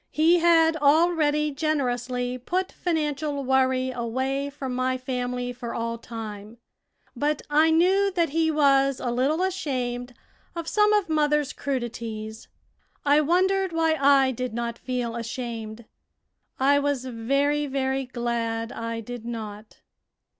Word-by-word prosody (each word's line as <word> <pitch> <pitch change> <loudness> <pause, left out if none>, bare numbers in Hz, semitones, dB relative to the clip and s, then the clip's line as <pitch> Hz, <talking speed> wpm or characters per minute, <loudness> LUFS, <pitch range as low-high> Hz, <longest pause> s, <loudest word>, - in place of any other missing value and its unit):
He 330 +3 +4
had 330 -1 +4
already 300 0 +3
generously 250 -4 -1
put 365 +9 -2
financial 300 -4 -2
worry 260 0 +2
away 260 +4 -2
from 270 -3 -5
my 255 +1 0
family 250 -1 -3
for 240 -1 -6
all 230 0 -3
time, 220 -1 -8 0.6
but 295 0 -1
I 310 +2 +5
knew 375 +5 +3
that 340 -3 +2
he 320 +2 +1
was 275 -3 +3
a 245 - -2
little 275 +8 +1
ashamed 250 -9 -3 0.4
of 335 -1 -5
some 420 +2 +3
of 415 -3 +2
mother's 300 -2 +1
crudities. 230 -4 -5 0.6
I 290 +1 +5
wondered 375 +3 +2
why 325 -1 +2
I 275 -3 +4
did 250 -1 -4
not 235 0 -3
feel 245 -3 -3
ashamed. 230 -2 -5 0.7
I 280 +2 +4
was 285 -3 -1
very, 275 +5 0
very 265 -1 -1
glad 235 -2 -2
I 230 0 -4
did 245 +1 -8
not. 215 -2 -7
265 Hz, 130 wpm, -25 LUFS, 240-305 Hz, 0.7 s, I